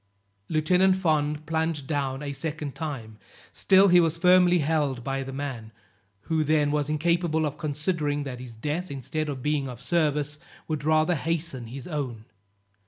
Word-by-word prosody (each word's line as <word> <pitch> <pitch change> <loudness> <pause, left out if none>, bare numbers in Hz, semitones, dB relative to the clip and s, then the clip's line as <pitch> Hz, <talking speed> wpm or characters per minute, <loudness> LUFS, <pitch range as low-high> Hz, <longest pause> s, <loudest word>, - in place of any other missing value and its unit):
Lieutenant 180 +4 +3
Fond 155 -4 0
plunged 160 -3 -1
down 135 -1 -2
a 140 -1 -4
second 150 0 -4
time; 120 -9 -6 0.3
still 195 +1 +5
he 180 0 +7
was 165 -1 +2
firmly 180 0 +5
held 145 -5 0
by 135 +1 -2
the 135 0 -6
man, 130 -5 -5 0.5
who 160 -1 0
then 150 -1 +2
was 150 -1 0
incapable 160 +1 +1
of 145 +1 -4
considering 150 -1 -1
that 130 -3 -6
his 125 -2 -9
death, 150 +10 -3
instead 150 +3 -3
of 130 -3 -5
being 150 -3 0
of 120 -2 -8
service, 150 -2 0 0.3
would 155 -3 -3
rather 155 +2 +3
hasten 160 -5 -2
his 130 +3 -8
own. 130 -9 -4
150 Hz, 160 wpm, -26 LUFS, 135-160 Hz, 0.5 s, he